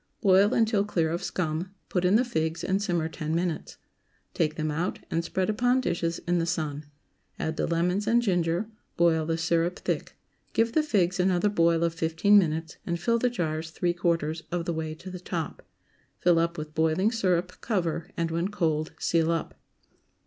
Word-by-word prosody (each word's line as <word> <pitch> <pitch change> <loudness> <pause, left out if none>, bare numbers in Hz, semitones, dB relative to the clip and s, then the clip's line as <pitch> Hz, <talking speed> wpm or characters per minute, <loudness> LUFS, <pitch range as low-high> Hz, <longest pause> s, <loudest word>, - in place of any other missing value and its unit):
Boil 195 +1 +5
until 220 -3 +2
clear 170 -6 0
of 170 +2 -2
scum; 180 +1 -3
put 180 - -1
in 180 +3 +4
the 245 +3 +4
figs 160 -7 -2
and 190 +1 0
simmer 175 -6 0
ten 160 -1 -3
minutes. 170 -1 -2 0.6
Take 155 -2 0
them 155 -1 -1
out 165 +4 -2
and 165 0 0
spread 185 +2 -1
upon 245 +4 +2
dishes 170 -8 -1
in 175 0 +2
the 165 - -1
sun. 155 -3 -2 0.5
Add 160 - -2
the - - -1
lemons 180 +5 0
and 235 +1 +4
ginger; 175 -3 0 0.3
boil 160 -2 +3
the 165 0 0
syrup 170 +1 +1
thick; - - -3 0.4
give 230 0 +2
the 310 - +3
figs 195 - +1
another 185 +2 +3
boil 170 -4 +3
of 170 -1 +1
fifteen 165 +5 +4
minutes, 160 -2 -2
and 170 -1 -2
fill 235 +6 +1
the 250 - +2
jars 160 -7 -2
three 175 +2 -1
quarters 165 -2 0
of 175 -1 -1
the 170 - -1
way 160 -1 -3
to 185 +4 -9
the 180 - -6
top. 175 -2 -4 0.6
Fill 175 -2 +3
up 170 +1 0
with 155 0 -6
boiling 160 +7 +2
syrup, 185 -5 0
cover, 175 -5 -1
and, 165 -1 -1
when 170 +2 0
cold, 160 -6 -1
seal 165 -1 +1
up. 165 -1 -2
170 Hz, 185 wpm, -27 LUFS, 160-190 Hz, 0.6 s, Boil